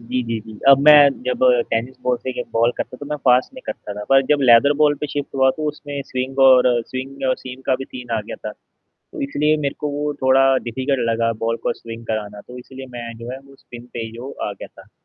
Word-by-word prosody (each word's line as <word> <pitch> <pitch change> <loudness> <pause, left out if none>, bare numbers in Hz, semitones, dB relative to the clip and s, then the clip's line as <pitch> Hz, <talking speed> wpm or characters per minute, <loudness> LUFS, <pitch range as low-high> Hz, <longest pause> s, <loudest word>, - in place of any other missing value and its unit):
जी, 125 +2 -2
जी, 115 -1 -3
जी। 110 0 -12
अब 135 -1 +8
मैं 150 -2 +9
जब 125 0 -2 0.3
टेनिस 120 +3 -2
बॉल 125 -1 +1
से 130 - -5
के 125 - -4
बॉल 115 +1 +3
करता 125 - -5
तो 145 - -9
मैं 150 - -3
फ़ास्ट 125 - +3
नहीं 260 - -11
करता 105 - -6
था। - - -6
पर 135 0 +6
जब 150 - +4
लेदर 125 +3 +6
बॉल 150 0 +4
पे 150 - -2
शिफ्ट 145 -1 -5
हुआ 130 0 +4
तो 155 -1 -2
उसमें 145 -1 -6
स्विंग, 130 +1 -4
और 125 -2 +5
स्विंग 135 +1 -5
और 130 - +3
सीम 130 0 -10
का 130 - +3
भी 135 +1 -4
सीन 125 -2 -10
आ - - -1
गया - - -6
था। 105 - -7 0.6
तो - - -7
इसलिए 150 +2 +1
मेरे 140 -2 -2
को 150 - -2
वो 145 +1 -2
थोड़ा 135 0 +4
डिफिकल्ट 130 0 -1
लगा 115 0 +1
बॉल 115 0 0
को - - 0
स्विंग 115 0 -10
कराना, 105 -2 -4
तो 125 - -12
इसलिए 130 +1 -10
मैं 115 -1 -6
जो 115 +1 -8
है 130 - -7
वो 135 0 -18
स्पिन 120 0 -12
पे 120 - -5
ही 110 - -9
जो 120 +4 -8 0.2
आ - - -3
गया - - -10
था। - - -18
130 Hz, 250 wpm, -20 LUFS, 115-140 Hz, 0.6 s, मैं